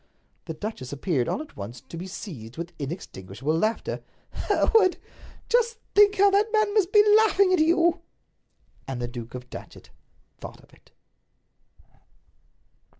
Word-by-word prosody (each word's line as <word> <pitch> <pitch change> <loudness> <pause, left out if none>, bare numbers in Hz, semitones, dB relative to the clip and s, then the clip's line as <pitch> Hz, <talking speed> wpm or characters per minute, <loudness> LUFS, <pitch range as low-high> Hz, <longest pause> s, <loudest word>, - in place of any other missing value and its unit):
The 160 - -6
duchess 155 - -6
appeared, 145 -3 -1
all 305 - -2
at 310 - -18
once, 110 +4 -7
to 130 +7 -12
be 175 +3 -6
seized 145 - -9
with 170 +1 -6
inextinguishable 135 - -4
laughter. 215 +7 -1 0.3
"Hereward," - - 0
she - - 0
cried, 390 -5 +4 0.5
"just 470 -1 +2 0.2
think 410 0 +6
how 400 +1 +5
that 415 +3 +2
man 430 -2 +2
must 405 -3 +2
be 420 0 +6
laughing 400 -3 +4
at 365 - +3
you!" 335 +1 +3 0.9
And 135 -2 -4
the 120 - -3
Duke 120 0 -8
of 125 0 -9
Datchet - - -11 0.5
thought - - -9
of - - -23
it. - - -23
205 Hz, 150 wpm, -25 LUFS, -, 0.9 s, think